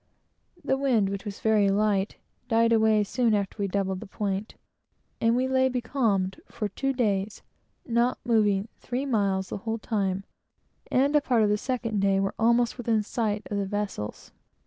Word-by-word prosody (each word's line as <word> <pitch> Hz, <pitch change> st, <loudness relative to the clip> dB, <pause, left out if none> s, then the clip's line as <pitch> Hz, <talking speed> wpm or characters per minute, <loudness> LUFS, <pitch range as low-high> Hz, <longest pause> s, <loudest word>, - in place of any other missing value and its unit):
The 265 Hz, -, +2 dB
wind, 240 Hz, -8 st, +2 dB
which 200 Hz, +1 st, -5 dB
was 200 Hz, -1 st, -6 dB
very 215 Hz, -2 st, +3 dB
light, 200 Hz, 0 st, +1 dB, 0.3 s
died 230 Hz, 0 st, +3 dB
away 220 Hz, -1 st, +4 dB
soon 230 Hz, +2 st, +1 dB
after 200 Hz, 0 st, -2 dB
we 200 Hz, -, 0 dB
doubled 190 Hz, -1 st, -1 dB
the 220 Hz, -, -9 dB
point, 200 Hz, 0 st, -3 dB, 0.7 s
and 230 Hz, +1 st, +3 dB
we 255 Hz, +1 st, +1 dB
lay 260 Hz, 0 st, +3 dB
becalmed 225 Hz, -7 st, 0 dB
for 210 Hz, -, -4 dB
two 270 Hz, +7 st, -1 dB
days, 210 Hz, -5 st, -1 dB, 0.4 s
not 240 Hz, +1 st, +1 dB
moving 210 Hz, -3 st, +2 dB
three 250 Hz, +3 st, -3 dB
miles 195 Hz, -7 st, 0 dB
the -, -, -4 dB
whole 225 Hz, +3 st, -3 dB
time, 195 Hz, -4 st, -1 dB, 0.7 s
and 280 Hz, +3 st, +2 dB
a 295 Hz, -, +5 dB
part 245 Hz, -5 st, +2 dB
of 210 Hz, -, +3 dB
the 210 Hz, -, +3 dB
second 230 Hz, -4 st, -2 dB
day 195 Hz, 0 st, +3 dB
were 195 Hz, 0 st, -1 dB
almost 235 Hz, +2 st, +2 dB
within 225 Hz, -3 st, +1 dB
sight 215 Hz, -1 st, -2 dB
of 205 Hz, -, -1 dB
the 200 Hz, -1 st, -1 dB
vessels. 200 Hz, -, -4 dB
215 Hz, 170 wpm, -27 LUFS, 200-235 Hz, 0.7 s, a